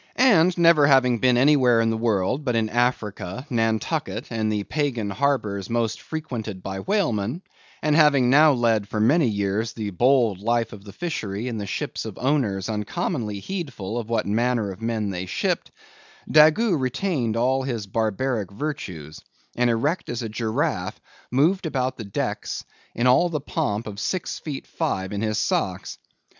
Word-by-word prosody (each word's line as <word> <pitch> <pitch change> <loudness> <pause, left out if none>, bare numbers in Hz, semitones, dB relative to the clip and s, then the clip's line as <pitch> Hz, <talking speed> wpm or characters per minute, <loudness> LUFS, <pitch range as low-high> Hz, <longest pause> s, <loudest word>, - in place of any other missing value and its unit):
And 185 -9 +4
never 165 -4 +6
having 125 -4 +4
been 125 0 +3
anywhere 130 -3 +4
in 115 0 +2
the - - -1
world 115 +4 0
but 125 -4 0
in 110 -1 +1
Africa, 120 -2 -1
Nantucket, 115 -2 -1
and 110 -2 -1
the 105 -1 -1
pagan 125 -7 -2
harbors 105 -6 -1
most 115 -1 -1
frequented 115 - -5
by 95 0 -4
whalemen; 150 - -1 0.4
and 150 -1 +2
having 145 -5 +5
now 150 +4 +6
led 115 -5 +1
for 105 - -3
many 135 +7 +4
years 105 +1 -1
the 105 -3 -4
bold 120 -1 +3
life 115 +2 0
of 100 -1 -12
the 100 - -9
fishery 115 - -4
in 115 -3 -3
the 100 - -5
ships - - -3
of - - -7
owners 125 -9 0
uncommonly 110 - -3
heedful 120 - -4
of 115 -1 -7
what 115 - 0
manner 115 0 0
of 95 - -11
men 110 -3 -1
they 90 0 -4
shipped; - - -1 0.6
Daggoo 160 +6 +5
retained 130 - -1
all 130 +3 +2
his 120 -6 -3
barbaric 110 +1 -1
virtues, 95 - -6 0.3
and 120 0 +2
erect 140 +10 0
as 120 0 -3
a 115 - -4
giraffe, 110 0 -2 0.3
moved 160 +8 +2
about 130 -3 -1
the 110 - -6
decks 100 - -3 0.3
in 120 - 0
all 150 +8 +5
the 155 -3 -2
pomp 110 -6 -2
of 100 -2 -7
six 185 - -2
feet 145 -4 -6
five 95 +1 -3
in 100 - -2
his 110 -1 -1
socks. 95 -3 -1
120 Hz, 165 wpm, -24 LUFS, 105-140 Hz, 0.6 s, never